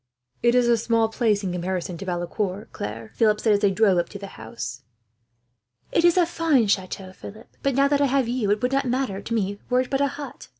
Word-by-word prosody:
"It 240 Hz, 0 st, +3 dB
is 250 Hz, -1 st, +4 dB
a 235 Hz, -1 st, +4 dB
small 230 Hz, 0 st, +2 dB
place 220 Hz, -3 st, +1 dB
in 185 Hz, -, -2 dB
comparison 180 Hz, 0 st, -3 dB
to -, -, -6 dB
Valecourt, 185 Hz, +3 st, -3 dB
Claire," 110 Hz, +1 st, -6 dB
Philip 215 Hz, -, +2 dB
said, 220 Hz, -1 st, +3 dB
as 205 Hz, -, +3 dB
they 205 Hz, -1 st, +3 dB
drove 195 Hz, -2 st, +3 dB
up 170 Hz, -, -2 dB
to 200 Hz, -, -8 dB
the 200 Hz, -1 st, -9 dB
house. 125 Hz, -, -6 dB, 1.1 s
"It -, -, +2 dB
is 345 Hz, +1 st, +5 dB
a 355 Hz, -, +5 dB
fine 330 Hz, -7 st, +2 dB
chateau, 190 Hz, -1 st, -2 dB
Philip; 215 Hz, +5 st, -11 dB
but 275 Hz, -2 st, 0 dB
now 275 Hz, +1 st, +4 dB
that 285 Hz, 0 st, +1 dB
I 285 Hz, -, +4 dB
have 265 Hz, -2 st, +1 dB
you, 240 Hz, -4 st, -1 dB
it 210 Hz, +3 st, +1 dB
would 250 Hz, -, +1 dB
not 275 Hz, 0 st, +1 dB
matter 245 Hz, -6 st, -1 dB
to 230 Hz, -, -5 dB
me 200 Hz, -2 st, -1 dB
were 250 Hz, 0 st, +3 dB
it 255 Hz, -, -6 dB
but 270 Hz, 0 st, +1 dB
a 280 Hz, -, +3 dB
hut. 280 Hz, 0 st, -8 dB
220 Hz, 240 wpm, -24 LUFS, 195-255 Hz, 1.1 s, is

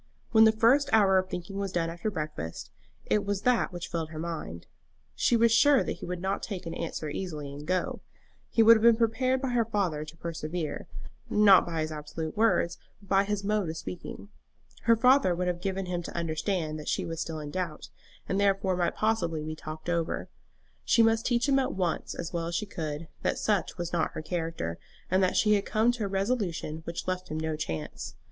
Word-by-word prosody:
When 220 Hz, -1 st, +7 dB
the 220 Hz, -, +7 dB
first 245 Hz, +6 st, +4 dB
hour 195 Hz, -4 st, +5 dB
of 185 Hz, 0 st, -3 dB
thinking 185 Hz, +3 st, -5 dB
was 195 Hz, -1 st, -2 dB
done 165 Hz, -2 st, 0 dB
after 170 Hz, +5 st, -3 dB
breakfast, 150 Hz, -, -5 dB, 0.3 s
it 210 Hz, -, +1 dB
was 200 Hz, -1 st, -2 dB
that 250 Hz, -4 st, +2 dB
which 175 Hz, -1 st, -5 dB
filled 165 Hz, -2 st, -3 dB
her 160 Hz, -, -9 dB
mind. 155 Hz, -, -5 dB, 0.5 s
She 235 Hz, -, +3 dB
was 230 Hz, 0 st, +4 dB
sure 285 Hz, +3 st, +5 dB
that -, -, -4 dB
he -, -, -8 dB
would 180 Hz, 0 st, -4 dB
not 195 Hz, +1 st, -1 dB
take 190 Hz, -4 st, -5 dB
an 165 Hz, -, -4 dB
answer 160 Hz, -2 st, -4 dB
easily 150 Hz, -3 st, -5 dB
and 145 Hz, +1 st, -9 dB
go. 185 Hz, 0 st, -1 dB, 0.5 s
He 225 Hz, -, +4 dB
would 230 Hz, +1 st, +9 dB
have 220 Hz, -, +1 dB
been 235 Hz, 0 st, +7 dB
prepared 255 Hz, +3 st, +1 dB
by 265 Hz, -, 0 dB
her 240 Hz, -1 st, +2 dB
father 195 Hz, -9 st, -1 dB
to 155 Hz, +2 st, -11 dB
persevere, 165 Hz, -1 st, -4 dB, 0.4 s
not 205 Hz, -4 st, +6 dB
by 165 Hz, -2 st, -2 dB
his 155 Hz, 0 st, -2 dB
absolute 155 Hz, +1 st, -5 dB
words, 215 Hz, -6 st, +2 dB, 0.2 s
but 200 Hz, -2 st, -20 dB
by 195 Hz, 0 st, +4 dB
his 205 Hz, 0 st, -2 dB
mode 205 Hz, -3 st, 0 dB
of 160 Hz, -, -4 dB
speaking. 180 Hz, +4 st, -7 dB, 0.6 s
Her 230 Hz, -, +6 dB
father 250 Hz, -5 st, +4 dB
would 180 Hz, +1 st, -1 dB
have 175 Hz, -1 st, -2 dB
given 195 Hz, 0 st, -2 dB
him 180 Hz, -1 st, -2 dB
to 170 Hz, -, -7 dB
understand 160 Hz, -1 st, -1 dB
that 150 Hz, -, -5 dB
she -, -, 0 dB
was 165 Hz, 0 st, -4 dB
still 160 Hz, -1 st, -4 dB
in 150 Hz, -1 st, -6 dB
doubt, 175 Hz, -4 st, -4 dB, 0.4 s
and 195 Hz, -, 0 dB
therefore 195 Hz, -1 st, +2 dB
might 175 Hz, -1 st, 0 dB
possibly 170 Hz, -8 st, 0 dB
be 155 Hz, 0 st, -4 dB
talked 155 Hz, +1 st, -8 dB
over. 170 Hz, -1 st, -1 dB, 0.5 s
She 230 Hz, -, +4 dB
must 225 Hz, +1 st, +2 dB
teach 240 Hz, +2 st, +2 dB
him 275 Hz, -1 st, +4 dB
at 265 Hz, -, -1 dB
once, 180 Hz, -4 st, -1 dB
as 170 Hz, +1 st, -5 dB
well 165 Hz, -1 st, -2 dB
as 170 Hz, -, -3 dB
she 210 Hz, -, -1 dB
could, 160 Hz, -4 st, -5 dB
that -, -, 0 dB
such 205 Hz, -4 st, 0 dB
was 175 Hz, -1 st, -4 dB
not 170 Hz, -, 0 dB
her 155 Hz, -, -5 dB
character, 165 Hz, -, -3 dB, 0.3 s
and 185 Hz, +1 st, +4 dB
that 185 Hz, -, +2 dB
she 210 Hz, -1 st, +4 dB
had 200 Hz, -1 st, +2 dB
come 220 Hz, +3 st, +2 dB
to 240 Hz, -4 st, -3 dB
a -, -, -1 dB
resolution 195 Hz, -6 st, -1 dB
which 170 Hz, +2 st, -5 dB
left 185 Hz, 0 st, -2 dB
him 155 Hz, -, -3 dB
no 160 Hz, 0 st, -2 dB
chance. 80 Hz, -, -5 dB
180 Hz, 215 wpm, -28 LUFS, 160-210 Hz, 0.6 s, would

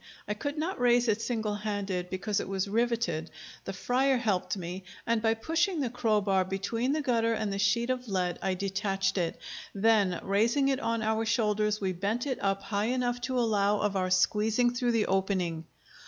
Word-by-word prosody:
I 210 Hz, -, 0 dB
could 285 Hz, +8 st, -4 dB
not 325 Hz, +2 st, -2 dB
raise 245 Hz, 0 st, +4 dB
it 220 Hz, 0 st, +1 dB
single 220 Hz, -3 st, -1 dB
handed, 200 Hz, -4 st, -3 dB
because 195 Hz, +3 st, -1 dB
it -, -, -5 dB
was 195 Hz, 0 st, -1 dB
riveted; 225 Hz, -7 st, 0 dB, 0.4 s
the -, -, -3 dB
friar 255 Hz, +6 st, +1 dB
helped 200 Hz, -5 st, 0 dB
me, 180 Hz, +1 st, -6 dB, 0.2 s
and 230 Hz, -1 st, +1 dB
by 225 Hz, 0 st, +2 dB
pushing 330 Hz, -, 0 dB
the 255 Hz, -5 st, -1 dB
crowbar 210 Hz, -5 st, +2 dB
between 210 Hz, +7 st, -2 dB
the 305 Hz, 0 st, -1 dB
gutter 230 Hz, -3 st, +2 dB
and 215 Hz, -2 st, -2 dB
the 195 Hz, -, -3 dB
sheet 235 Hz, +5 st, +2 dB
of 250 Hz, -1 st, -3 dB
lead 180 Hz, -4 st, -1 dB
I 190 Hz, -, 0 dB
detached 195 Hz, 0 st, -1 dB
it; 170 Hz, -2 st, -2 dB, 0.4 s
then 200 Hz, -3 st, +3 dB
raising 230 Hz, +8 st, +2 dB
it 270 Hz, -1 st, +1 dB
on 230 Hz, -4 st, -1 dB
our 220 Hz, +1 st, +1 dB
shoulders, 210 Hz, -2 st, +1 dB
we 190 Hz, -2 st, -1 dB
bent 205 Hz, +8 st, -2 dB
it 265 Hz, -3 st, -2 dB
up 195 Hz, 0 st, 0 dB
high 205 Hz, -1 st, -1 dB
enough 245 Hz, 0 st, -1 dB
to 255 Hz, +1 st, -2 dB
allow 210 Hz, -3 st, +2 dB
of 205 Hz, -1 st, 0 dB
our 185 Hz, -1 st, 0 dB
squeezing 215 Hz, +6 st, +2 dB
through 245 Hz, -1 st, 0 dB
the 225 Hz, -2 st, +2 dB
opening. 185 Hz, -4 st, -1 dB
210 Hz, 190 wpm, -29 LUFS, 195-240 Hz, 0.4 s, raise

